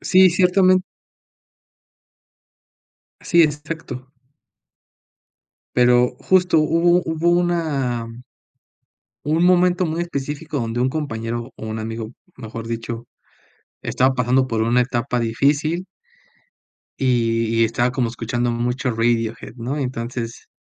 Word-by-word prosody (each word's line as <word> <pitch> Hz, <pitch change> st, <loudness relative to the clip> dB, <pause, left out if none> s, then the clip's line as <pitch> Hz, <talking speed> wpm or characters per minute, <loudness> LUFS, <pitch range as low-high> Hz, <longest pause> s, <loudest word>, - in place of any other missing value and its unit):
sí, 185 Hz, 0 st, +5 dB
ciertamen 185 Hz, +1 st, +4 dB, 2.4 s
Sí, 170 Hz, -1 st, +4 dB
exacto. 150 Hz, -4 st, -4 dB, 1.7 s
Pero 125 Hz, 0 st, +4 dB
justo 180 Hz, -3 st, +3 dB
hubo 170 Hz, +3 st, +3 dB
hubo 160 Hz, +1 st, 0 dB
una 155 Hz, -9 st, 0 dB, 1.2 s
un 160 Hz, +3 st, +2 dB
momento 180 Hz, 0 st, +4 dB
muy 165 Hz, +1 st, -2 dB
específico 150 Hz, -1 st, -4 dB
donde 115 Hz, 0 st, -2 dB
un 130 Hz, -, +2 dB
compañero 120 Hz, -5 st, -4 dB
o 110 Hz, -, -8 dB
un 110 Hz, 0 st, -4 dB
amigo, 110 Hz, 0 st, -5 dB, 0.3 s
mejor 115 Hz, -1 st, -7 dB
dicho, 115 Hz, 0 st, -5 dB, 0.8 s
estaba 130 Hz, +1 st, +1 dB
pasando 125 Hz, +2 st, +2 dB
por 115 Hz, -3 st, -1 dB
una 120 Hz, +2 st, +3 dB
etapa 125 Hz, 0 st, -1 dB
difícil 145 Hz, +9 st, 0 dB, 1.1 s
y 115 Hz, -3 st, +1 dB
y 115 Hz, -, +6 dB
estaba 120 Hz, +2 st, 0 dB
como 130 Hz, -3 st, -1 dB
escuchando 120 Hz, +1 st, -2 dB
mucho 125 Hz, +3 st, -1 dB
Radiohead, 115 Hz, -1 st, -1 dB
¿no? 130 Hz, +5 st, -4 dB
Y -, -, 0 dB
entonces 120 Hz, -1 st, -5 dB
125 Hz, 110 wpm, -21 LUFS, 115-160 Hz, 2.4 s, y